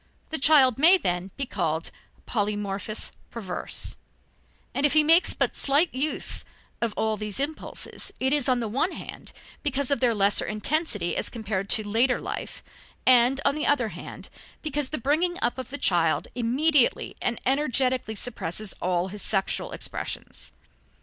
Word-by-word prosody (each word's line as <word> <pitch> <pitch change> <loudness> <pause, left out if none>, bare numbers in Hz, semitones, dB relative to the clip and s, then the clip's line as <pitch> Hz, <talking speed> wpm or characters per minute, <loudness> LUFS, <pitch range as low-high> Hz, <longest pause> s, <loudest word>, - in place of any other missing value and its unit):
The 315 - 0
child 270 -4 +5
may, 340 +6 +8
then, 180 - -2
be 275 - -1
called 165 -8 -2 0.4
"polymorphus 205 -1 -2 0.2
perverse," 195 -6 -4 0.8
and 275 - -1
if 290 - +4
he 310 -1 +6
makes 330 +4 +5
but - - 0
slight 285 +5 +2
use 280 +4 -1 0.4
of 230 -3 -1
all 220 -1 0
these 210 +1 -4
impulses, 295 +3 -3
it 265 +2 +1
is, 285 -3 +3
on 250 -1 +2
the 230 - -2
one 270 - 0
hand, - - -9 0.3
because 280 -2 0
of 280 - +2
their 235 -2 +2
lesser 200 0 +2
intensity 215 - 0
as - - -1
compared 200 -4 -4
to 215 -2 0
later 235 +5 +2
life, - - -6 0.4
and 255 +2 +5
on - - +4
the 300 +1 -2
other 250 -6 +2
hand, - - -9 0.3
because 295 -3 -1
the 305 - -2
bringing 325 +8 +1
up 240 +2 0
of 260 - -6
the 285 - -2
child 170 - +2
immediately 255 +4 +2
and 240 -1 -1
energetically 260 -4 0
suppresses 215 -2 -3
all 180 0 0
his 205 +1 -5
sexual 195 -2 0
expressions. - - -5
245 Hz, 155 wpm, -26 LUFS, 210-285 Hz, 0.8 s, may